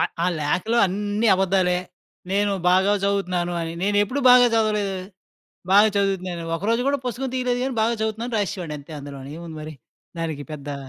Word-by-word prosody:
ఆ - - +4 0.2
ఆ - - +2
లేఖలో 185 +10 0
అన్నీ 205 +4 -1
అబద్దాలే, 185 -1 +2 0.5
నేను 205 0 +2 0.2
బాగా 190 +3 +4
జదువుతున్నాను 180 -3 0
అని. 165 - -4
నేనెప్పుడూ 205 +7 +1
బాగా 250 0 +8
జదవలేదు. 210 -3 +1 0.8
బాగా 205 +2 +7
చదువుతున్నానని. 185 -4 -1
ఒకరోజు 225 +7 0
గూడా 280 0 +2
పుస్తకం 250 +2 -3
తీలేదు 250 -1 0
గానీ, 265 -1 -2
బాగా 230 +2 +2
జదువుతున్నానని 225 +2 -2
రాసేసేవాడినంతే 165 -7 -4
అందులోనేముంది 145 +4 -8
మరి. 155 0 -8 0.4
దానికి 160 -3 -3
పెద్దా 145 -1 -6
195 Hz, 145 wpm, -23 LUFS, 170-220 Hz, 0.8 s, బాగా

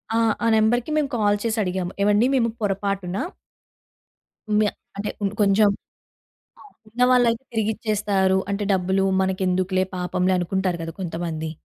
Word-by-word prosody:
ఆ! - - +3 0.3
ఆ - - +3
నెంబర్‌కి 235 +6 +2
మేము 290 -2 +1
కాల్ 205 -2 +2
చేసి 225 0 -1
అడిగాము. 180 0 -2
ఏవండీ 210 +4 +4
మేము 230 -2 +2
పొరపాటున 195 -2 -2 1.4
మ్యా 210 -1 +2 0.3
అంటే 205 +1 -3
ఇప్పుడు 205 0 -3
కొంచెం 200 +1 +4 0.9
ఆ! - - -14 0.3
ఉన్నవాళ్ళైతే 245 +1 +3
తిరిగి 220 -1 +1
ఇచ్చేస్తారు. 200 -3 +1
అంటే 205 +1 -1
డబ్బులు 190 +1 +1 0.2
మనకెందుకులే 185 0 0
పాపంలే 180 +1 0
అనుకుంటారు 180 0 -1
కదా! 165 0 -6
కొంతమంది. 165 -2 -4
200 Hz, 130 wpm, -23 LUFS, 185-220 Hz, 1.4 s, ఏవండీ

